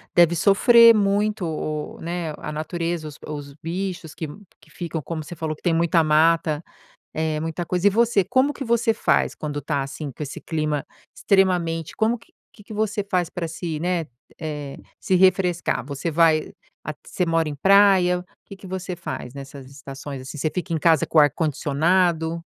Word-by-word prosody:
Deve 175 -1 +5
sofrer 230 +6 +7
muito 205 -1 +1
o 155 -1 -3 0.2
o - - -17
né, 170 -2 -3
a 150 - -6
natureza 165 +1 -3
os 150 -1 -10
os 145 -2 -7
bichos 175 0 -5
que 160 - -5 0.3
que - - -22
ficam, 165 -2 -5
como 160 +2 -5
você 175 - -9
falou 160 -1 -3
que - - -24
tem 175 - +1
muita 165 0 +3
mata, 155 0 +3 0.5
é 155 -1 -1
muita 165 +2 -3
coisa. 180 +3 +1
E - - +7
você, 225 -1 +3
como 260 +9 +2
que 275 - -6
você 230 -1 +2
faz 220 - +1
quando 145 -1 -5
tá, 140 0 -1
assim, 140 +1 -6
com 130 - -12
esse 140 - -7
clima 155 -3 -2 0.3
extremamente 175 -5 +1
como 225 +2 +1
que 230 - -23
o - - -66 0.2
que 210 - -16
que 215 - -10
você 215 -1 -1
faz 180 -3 +1
pra 175 -3 -4
se, 160 -1 -5
né, 175 0 -1 0.3
eh, 150 -3 -5 0.2
se 190 - +1
refrescar, 180 -4 +2
você 145 +4 -4
vai 160 -1 +3 0.3
at 155 - -5
você 180 - -1
mora 165 -1 +1
em 150 - -4
praia? 190 +1 +4 0.2
Que 195 - -10
que 190 - -12
você 185 0 -4
faz 125 -6 -6
nessas 140 -1 -10
estações 135 0 -8
assim? 130 +4 -8
Você 155 +2 -1
fica 180 0 -3
em - - +1
casa 160 -1 +3
com - - -1
o - - +10
ar-condicionado? 160 +3 +1
165 Hz, 190 wpm, -23 LUFS, 155-185 Hz, 0.5 s, o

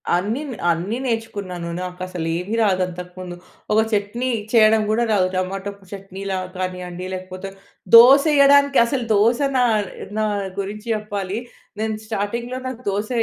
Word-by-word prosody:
అన్నీ 210 +10 -1 0.3
అన్నీ 180 +8 -2
నేర్చుకున్నాను. 205 -7 -3
నాకు 180 0 -7
అసలు 180 -3 -5
ఏమీ 195 +6 -3
రాదు 190 -3 +2
అంతకుముందు. 180 0 -8 0.4
ఒక 220 - +5
చట్నీ 215 +5 -1 0.2
చేయడం 220 -1 +6
కూడా 225 +2 +2
రాదు. 190 -3 +3
టమాటో 195 +2 -2 0.2
చట్నీలా 195 -1 -5 0.2
కానీయండి 180 -1 -5
లేకపోతే 185 +1 -6 0.5
దోస 265 +5 +9
యేయడానికి 280 0 +5
అసలు 245 0 -2
దోస 225 +4 +3 0.2
నా 250 - +4 0.6
నా 215 - +2 0.3
గురించి 210 +3 -5
చెప్పాలి. 205 -2 -4 0.4
నేను 220 -1 -1
స్టార్టింగ్‌లో 235 +4 -3
నాకు 250 -1 -6
దోస 205 +3 -2
205 Hz, 130 wpm, -21 LUFS, 185-230 Hz, 0.6 s, దోస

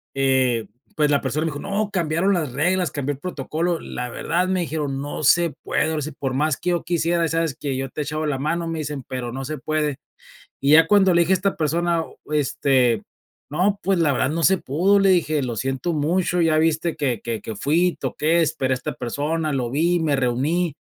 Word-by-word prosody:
Eh, 130 -4 +2 0.3
pues 150 -1 +2
la 140 - +2
persona 145 +4 -1
me 160 - -1
dijo: 145 - -6
"No, 205 +3 -2
cambiaron 175 +1 +1
las 155 -9 -1
reglas, 175 +5 +1
cambió 145 0 -2
el 135 - -11
protocolo, 165 +1 -2
la 125 0 -5
verdad", 175 +9 -1
me 185 -1 0
dijeron: 145 -4 -3
"No 145 +2 -5
se 170 +3 +4
puede, 160 - 0
ahora 155 -1 -2
sí, 155 +2 -4
por 135 -2 -4
más 150 +1 +1
que 180 - -1
yo 175 - -1
quisiera, 170 0 +1
¿sabes 165 -3 -1
qué? 140 -2 -2
Yo 135 0 -3
te 150 - -5
he - - 0
echaba 155 +1 -3
la 140 -3 -1
mano", 165 +4 -1
me 165 -1 -3
dicen 145 -3 -4
"pero 125 -2 -4
no 135 +2 -5
se 155 +3 -4
puede". 150 -1 -1 0.6
Y 140 - +2
ya 165 +1 +7
cuando 195 -3 +5
le 170 - +4
dije 170 +3 +3
a - - +5
esta 195 +2 0
persona, 170 +2 +1 0.3
este, 135 -5 +2 0.5
"No, 195 +6 +1
pues, 190 -1 +1
la 150 -4 +3
verdad 130 0 +1
no 165 +2 -2
se 190 +3 +5
pudo", 180 +9 +2
le 195 - +4
dije. 155 -5 +2
"Lo 120 -3 -3
siento 135 - -2
mucho, 170 +4 0
ya 160 -2 +3
viste 160 +1 +1
que 130 -7 -1
que 115 -2 -4
que 110 - -6
fui, 170 - +1
toqué, 160 +3 +1
esperé 150 -4 0
a - - +1
esta 125 - -5
persona, 150 +6 -2
lo 125 -3 -1
vi, 170 +5 +2
me 155 -3 +1
reuní", 140 +6 0
155 Hz, 220 wpm, -22 LUFS, 135-170 Hz, 0.6 s, ya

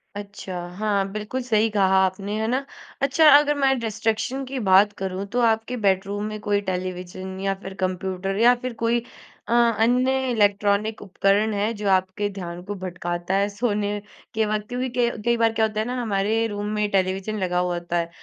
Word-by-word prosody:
अच्छा, 200 -3 -7 0.2
हाँ 200 -2 0
बिल्कुल 215 +5 -4
सही 225 -2 +2
कहा 195 -3 +2
आपने 195 +2 -3
है 220 - 0
ना। 260 +4 0 0.4
अच्छा 275 +3 +4
अगर 295 0 +2
मैं 270 -2 +2
डिस्ट्रैक्शन 225 +4 -2
की 260 0 -4
बात 195 +2 +6
करूँ, 190 0 -3
तो 240 +5 -2
आपके 225 +2 +1
बेडरूम 200 -1 0
में 215 0 -5
कोई 205 -1 +1
टेलीविज़न 185 0 -5
या 195 0 0
फिर 190 - -6
कंप्यूटर 185 +1 -2
या 240 +2 +7
फिर 255 -1 -4
कोई 230 +1 +1 0.5
अ, - - 0
अन्य 240 +2 +3 0.2
इलेक्ट्रॉनिक 205 0 +1
उपकरण 205 +2 +1
है, 205 +2 0
जो 205 -2 -2
आपके 190 +2 +1
ध्यान 175 -2 -6
को 205 +2 -5
भटकाता 175 -1 -4
है 200 +1 +1
सोने 205 -1 -1 0.3
के 220 -1 +1
वक़्त? 210 0 -2
क्योंकि 250 +1 -2
क 235 -2 +1
कई 235 0 +3
बार 230 -1 +2
क्या 225 -1 +2
होता 215 -1 -3
है 215 - 0
ना, 250 +1 -3
हमारे 220 +1 0
रूम 205 -1 -4
में 210 -1 0
टेलीविज़न 190 +2 0
लगा 180 -2 0
हुआ 180 0 0
होता 175 0 -2
है, 170 0 -1
205 Hz, 190 wpm, -23 LUFS, 190-225 Hz, 0.5 s, या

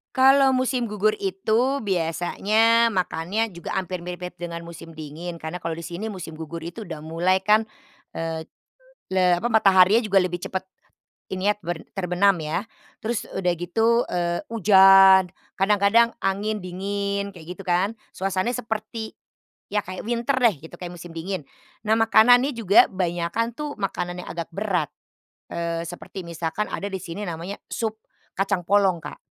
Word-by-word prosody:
Kalau 270 +1 +6
musim 255 -2 0
gugur 210 +1 +1
itu 220 +8 +1
biasanya 205 +6 +2
makannya 190 +2 -1
juga 170 -1 -5
hampir 185 -1 -3
mirip-mirip 180 0 -6
dengan 170 -1 -5
musim 170 0 -10
dingin, 160 +3 -7
karena 160 +2 -6
kalau 165 -1 -3
di 170 - -7
sini 185 +5 -5
musim 180 -5 -7
gugur 160 +1 -7
itu 175 +7 -7
udah 170 -6 -6
mulai 165 +5 +1
kan, 210 +2 +5 0.6
eee, 165 -1 -3 0.7
le 180 -2 +4
apa, 235 - -1
mataharinya 205 -1 +5
juga 200 -2 +3
lebih 180 -1 -2
cepat, 190 0 -4 0.6
ini 190 +2 0
yah, 210 - -4
ber 175 -3 -5
terbenam 185 0 +2
ya. 160 +4 -2 0.4
Terus 230 0 -2
udah 180 -2 +1
gitu, 225 +7 +2
eee, 175 -1 -1
hujan, 195 -4 +7 0.3
kadang-kadang 210 +4 +4
angin 205 +1 -1
dingin, 200 +2 -3
kayak 170 0 -9
gitu - - -7
kan. 180 +4 +2 0.2
Suasananya 195 +5 -1
seperti, 220 0 -4 0.6
ya 205 0 -1
kayak 185 0 -6
winter 235 +4 -1
deh 240 -5 +4
gitu 170 - -14
kayak 175 0 -7
musim 170 0 -10
dingin. 165 -2 -4 0.4
Nah, 215 - +4
makanannya 235 +4 +5
juga 225 -6 +4
banyakan 180 +5 -1
tuh 295 0 -6
makanan 180 -3 -3
yang - - -7
agak 170 -1 -5
berat, 180 -4 -1 0.6
eee, 170 0 -2
seperti 175 +2 -8
misalkan 170 +4 -3
ada 200 - -3
di 190 -1 -4
sini 195 +5 -6
namanya 175 +4 -5
sup 220 -1 -3 0.4
kacang 195 -2 0
polong, 190 -3 +2
Kak. - - -8
190 Hz, 155 wpm, -24 LUFS, 175-215 Hz, 0.7 s, hujan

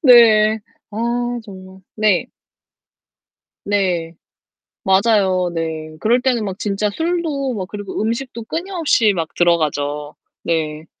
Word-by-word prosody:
네, 220 -5 +7 0.3
아 205 - -9 0.5
정말. 190 -2 -12 0.2
네. 210 -4 +2 1.4
네, 180 -5 0 0.7
맞아요. 190 -3 +3
네. 160 -1 -4
그럴 240 +6 +2
때는 245 -4 +1
막 190 -1 -4
진짜 205 0 0
술도 320 - -1
막 190 -3 -4
그리고 205 0 -5
음식도 235 +1 -3
끊임없이 330 - +1
막 165 -4 -2
들어가죠. 150 -3 0 0.3
네. 155 -2 -2
200 Hz, 195 characters per minute, -19 LUFS, 170-235 Hz, 1.4 s, 네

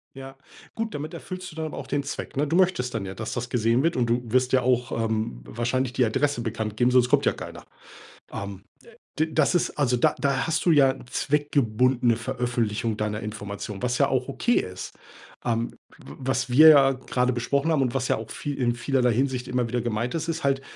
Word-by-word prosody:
Ja. 135 0 -9 0.4
Gut, 225 -1 -3
damit 155 +4 -5
erfüllst 185 +1 -7
du 155 - -14
dann 160 - -3
aber - - -7
auch - - -7
den 145 - 0
Zweck, 140 - -6
ne? 145 +1 +1
Du 165 - 0
möchtest 180 -10 +2
dann 105 -4 -3
ja, 95 - -6
dass 110 +3 -5
das 120 0 -4
gesehen 115 +3 +2
wird 165 - +1
und 120 -2 +1
du 120 +1 +1
wirst 125 +2 +1
ja 130 - +5
auch, 125 -1 +1
ähm, 110 - -2
wahrscheinlich 125 - -2
die 125 - +3
Adresse 140 +4 0
bekannt 110 -2 -3
geben, 125 +2 +3
sonst 125 -1 +4
kommt - - +3
ja - - +3
keiner. - - -9 0.7
Ähm, 100 -1 -6 0.6
d 155 - +3
das - - +2
ist 175 - +2
also 125 -4 +2
da - - +2
da 140 0 0
hast 165 -1 -1
du 175 - +4
ja 135 -4 +5
zweckgebundene 125 -4 +1
Veröffentlichung 120 -3 -2
deiner 105 0 -2
Information, 105 -1 -6
was 125 0 0
ja - - +3
auch 130 0 -1
okay 240 - +1
ist. 90 -10 -7 0.5
Ähm, 115 -1 -1 0.3
w - - -12
was 130 -1 -1
wir 155 +6 +8
ja 140 -3 +7
grade 125 -1 -1
besprochen 140 +6 0
haben 140 -3 +2
und 125 -1 -1
was 130 -1 -1
ja - - +2
auch 110 0 -8
viel 145 -1 -5
in 120 -2 +1
vielerlei 125 0 +1
Hinsicht 130 0 -1
immer 125 -1 0
wieder 120 +1 -1
gemeint 120 +1 -2
ist, 165 0 -3
ist 165 -3 -3
halt 135 0 +1
125 Hz, 215 wpm, -25 LUFS, 115-140 Hz, 0.7 s, wir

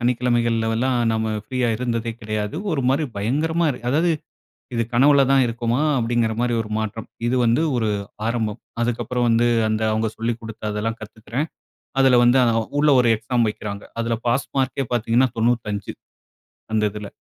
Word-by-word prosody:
சனிக்கிழமைகள்லலா, 120 -1 +1 0.2
நம்ம 110 0 -1
ஃப்ரீயா 125 +1 -1
இருந்ததே 115 -1 -2
கெடயாது. 110 +2 -3 0.2
ஒரு 140 -4 0
மாரி 140 +4 +2
பயங்கரமா 155 +11 0
இருக்கு 125 -2 -4
அதாவது, 165 +6 +2 0.6
இது 115 - +1
கனவுல 140 +3 +5
தான் 135 -1 +5
இருக்கமா, 120 +2 -1 0.2
அப்படிங்கிற 115 -1 0
மாரி, 120 -1 +1
ஒரு 105 - -10
மாற்றம். 110 0 -4 0.2
இது 130 - +1
வந்து, 120 +7 +3
ஒரு 110 -2 0 0.4
ஆரம்பம். 115 -1 -2 0.2
அதுக்கப்புறம் 120 +1 -1
வந்து, 115 +1 +3 0.2
அந்த 110 0 -1
அவங்க 110 +1 0
சொல்லிக் 115 +1 -2
குடுத்தாதெல்லாம் 110 0 -4
கத்துக்குறேன். 115 +7 -5 0.5
அதில 130 -2 +6
வந்து, 120 +2 +5 0.4
உள்ள 150 0 +4
ஒரு 120 - +3
எக்ஸாம் 115 +1 0
வக்கிறாங்க. 100 -1 -5 0.2
அதில, 115 0 0
பாஸ் 125 +3 0
மார்கே 135 +1 0
பாத்திங்கன்னா, 120 +2 +2
95, 110 -3 0 0.8
அந்த 110 - +2
இதுல. 105 0 -7
120 Hz, 145 wpm, -22 LUFS, 110-125 Hz, 0.8 s, அதில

